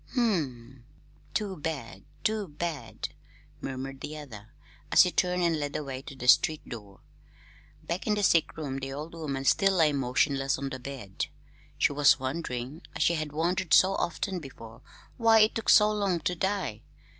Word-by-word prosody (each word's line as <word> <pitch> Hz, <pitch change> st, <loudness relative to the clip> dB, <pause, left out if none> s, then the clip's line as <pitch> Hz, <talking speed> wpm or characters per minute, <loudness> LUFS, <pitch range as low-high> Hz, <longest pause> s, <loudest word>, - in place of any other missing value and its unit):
"Hm -, -, -9 dB, 0.2 s
m; 130 Hz, -6 st, -5 dB, 0.5 s
too 200 Hz, -3 st, -1 dB
bad, 145 Hz, -6 st, -5 dB, 0.2 s
too 215 Hz, -2 st, 0 dB
bad!" 150 Hz, -5 st, -5 dB, 0.5 s
murmured 135 Hz, +1 st, -5 dB
the 150 Hz, +1 st, -6 dB
other, 115 Hz, -9 st, -10 dB, 0.4 s
as -, -, +8 dB
he 180 Hz, -, 0 dB
turned 180 Hz, 0 st, +1 dB
and 165 Hz, -2 st, +2 dB
led 145 Hz, -1 st, -3 dB
the 150 Hz, -, -2 dB
way 135 Hz, -2 st, -6 dB
to 140 Hz, -, -10 dB
the 125 Hz, -1 st, -6 dB
street 155 Hz, +4 st, +4 dB
door. 105 Hz, -5 st, -10 dB, 0.8 s
Back 170 Hz, +6 st, -4 dB
in 210 Hz, -, +3 dB
the 205 Hz, -, -1 dB
sick 165 Hz, -5 st, +3 dB
room 140 Hz, -4 st, -4 dB
the 135 Hz, 0 st, -5 dB
old 150 Hz, +4 st, -6 dB
woman 140 Hz, -5 st, -4 dB
still 195 Hz, +7 st, +4 dB
lay 160 Hz, -5 st, +3 dB
motionless 135 Hz, +1 st, +1 dB
on 135 Hz, 0 st, -4 dB
the 130 Hz, -, -6 dB
bed. 125 Hz, -7 st, -5 dB, 0.5 s
She -, -, +2 dB
was 145 Hz, 0 st, +5 dB
wondering 130 Hz, +1 st, -4 dB
as -, -, +1 dB
she 170 Hz, -, +3 dB
had 155 Hz, -2 st, -3 dB
wondered 165 Hz, +1 st, +2 dB
so 190 Hz, +1 st, +5 dB
often 190 Hz, +1 st, -2 dB
before 115 Hz, -6 st, -11 dB, 0.4 s
why 225 Hz, -2 st, +6 dB
it 215 Hz, +2 st, +4 dB
took 225 Hz, -, -2 dB
so 210 Hz, 0 st, +7 dB
long 200 Hz, -4 st, 0 dB
to 180 Hz, -, 0 dB
die. 180 Hz, -, -2 dB
150 Hz, 180 wpm, -28 LUFS, 135-180 Hz, 0.8 s, as